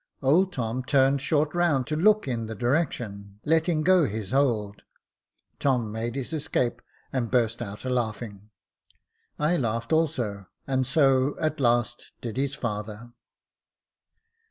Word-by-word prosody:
Old 175 +8 +4
Tom 125 -3 -2
turned 135 +1 +3
short 150 +1 +1
round 170 -7 +2
to 155 - -2
look 210 +3 +3
in 115 -3 -2
the 110 - -6
direction, 110 - -2
letting 160 0 +2
go 180 -1 +5
his 105 -2 -4
hold. 115 -7 +1 0.8
Tom 125 -6 +1
made 115 +2 -3
his 135 +3 -4
escape, 145 -5 -1 0.3
and 125 -4 -1
burst 120 -2 +1
out 105 +1 -7
a - - -1
laughing. 110 -4 -3 0.9
I 155 +4 +2
laughed 115 0 -1
also, 120 - 0 0.2
and 130 -2 0
so 135 -1 +3
at 155 -1 -1
last 120 -2 0
did 115 -3 -6
his 135 +1 -1
father. 110 -1 -5
130 Hz, 135 wpm, -26 LUFS, 115-150 Hz, 0.9 s, go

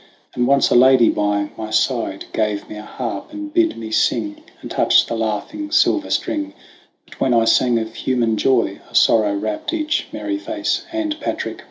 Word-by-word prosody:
And 125 0 0
once 140 0 +3
a - - +4
maiden 130 -1 +6
by 105 0 -1
my 110 -1 -5
side 110 -2 -1
Gave 105 -2 -1
me - - -9
a - - -7
harp, 115 - -6
and 305 0 -7
bid 335 -1 +2
me 110 -1 -7
sing, 105 -2 0 0.2
And - - -9
touch - - +4
the - - -5
laughing 115 - -3
silver 315 - +2
string; 300 -1 -2 0.5
But - - -17
when 125 -2 +2
I 115 -1 +3
sang 120 +1 +3
of 110 0 -4
human 120 -4 0
joy 115 -4 +1
A - - -13
sorrow 105 -3 +4
wrapped 105 - -3
each 310 -2 -1
merry 310 0 -4
face, 315 +1 -2
And, 320 -1 -3
Patric! - - -4
120 Hz, 185 wpm, -19 LUFS, -, 0.5 s, maiden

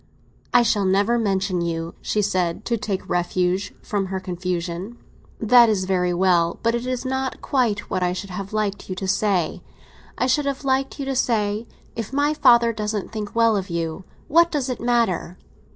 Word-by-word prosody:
"I 245 - +5
shall 210 -3 +1
never 200 +5 +2
mention 195 -4 0
you," 165 -1 -3
she 210 - 0
said, 185 -1 -1
to 235 - 0
take 200 -3 -3
refuge 180 +2 0
from 200 -4 -2
her 190 0 -3
confusion. 180 +3 -4 0.4
"That 235 +1 +6
is 195 -3 0
very 180 -1 +1
well; 175 -2 +2
but 230 0 +2
it 235 +1 -2
is 255 0 -2
not 265 0 -2
quite 235 -6 0
what 185 - -2
I 180 0 +1
should 190 +2 -5
have 195 +2 -6
liked 210 -2 -2
you 185 - -3
to 190 +1 -4
say. 190 -4 0 0.6
I - - +1
should 260 +3 +2
have 280 0 -3
liked 270 0 0
you 275 - -2
to 270 0 -2
say: 220 -3 0 0.3
'If 225 0 -5
my 290 +2 +2
father 235 -5 +5
doesn't 210 -1 -3
think 215 0 -5
well 230 -1 +4
of 195 -1 -2
you, 170 +1 -3 0.2
what 335 +3 +5
does 280 -5 -1
it 250 - -4
matter? 230 -7 0
210 Hz, 185 wpm, -22 LUFS, 185-240 Hz, 0.6 s, That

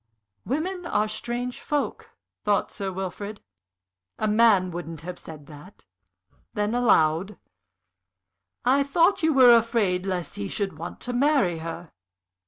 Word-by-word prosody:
"Women 345 +6 -2
are 210 -6 +1
strange 240 +3 -4
folk," 295 -2 -3 0.3
thought 205 -1 +1
Sir 195 -1 -4
Wilfrid. 195 +3 -6 0.8
"A 215 - 0
man 210 -4 +4
wouldn't 165 -2 -7
have 175 +1 -7
said 155 -3 -11
that." 150 +6 -14 0.7
Then, 210 +1 0
aloud: 190 -5 +2 1.3
"I 265 +3 +4
thought 335 +7 +2
you 320 0 +3
were 255 -4 +7
afraid 215 -5 +1
lest 180 -3 -3
he 100 - -3
should 195 -6 -3
want 170 - -7
to 245 - -4
marry 245 - +2
her?" 165 +1 -7
210 Hz, 130 wpm, -25 LUFS, 175-245 Hz, 1.3 s, were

